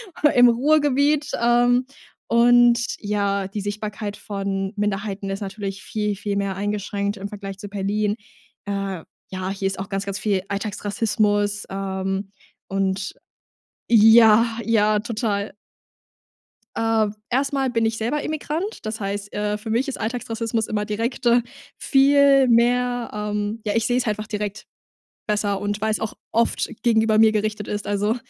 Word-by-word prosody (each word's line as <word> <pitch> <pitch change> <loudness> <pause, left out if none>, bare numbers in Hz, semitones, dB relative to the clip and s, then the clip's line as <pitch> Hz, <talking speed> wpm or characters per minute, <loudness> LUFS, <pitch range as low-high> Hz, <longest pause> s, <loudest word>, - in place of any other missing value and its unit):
aber 295 - +3
im 245 0 +7
Ruhrgebiet, 290 +2 +2
ähm, 245 +1 +3 0.4
und, 240 0 +5 0.2
ja, 200 -2 -1
die 205 +2 -5
Sichtbarkeit 205 0 -5
von 195 -1 -3
Minderheiten 200 -1 -2
ist 195 +2 -4
natürlich 195 -1 -5
viel, 210 -1 -2
viel 200 0 -3
mehr 200 -1 -1
eingeschränkt 205 0 -2
im 195 - -5
Vergleich 195 -2 -8
zu 205 - -7
Berlin. 205 +1 -1 0.5
Äh, 195 -4 -3 0.3
ja, 185 0 -4
hier 195 0 -2
ist 190 - -3
auch 195 - -5
ganz, 195 0 -2
ganz 195 -1 -3
viel 200 -3 0
Alltagsrassismus, 205 0 -1
ähm, 195 0 -3 0.4
und 195 0 -1 0.8
ja, 225 0 +7 0.2
ja, 215 -1 +3
total. 215 -3 -2 1.2
Äh. 225 -1 +2 0.2
Erst 275 +3 +1
mal 270 -2 0
bin 230 -1 +1
ich 225 0 -1
selber 245 +7 -1
Immigrant, 310 - -4
das 215 +1 -4
heißt, 200 0 -4
äh, 210 0 -1
für 220 +1 -7
mich 240 +5 +1
ist 275 - -4
Alltagsrassismus 230 -1 -2
immer 210 -1 -1
direkt, 230 +4 -3
äh, 240 +1 +5 0.4
viel 275 -1 +5
mehr, 245 +1 +2
ähm 210 +1 -3
ja, 210 -1 -1
ich 225 -1 +1
sehe 245 +1 +1
es 250 - 0
einfach 215 0 -2
direkt 210 -1 -4 0.6
besser 205 -2 0
und 205 0 -2
weil 220 0 +1
es 215 - 0
auch 220 -1 -3 0.2
oft 230 +1 +1
gegenüber 220 -2 +3
mir 220 0 +6
gerichtet 215 -1 -2
ist. 205 -1 -4
Also, 205 +3 +1
210 Hz, 150 wpm, -22 LUFS, 200-235 Hz, 1.2 s, im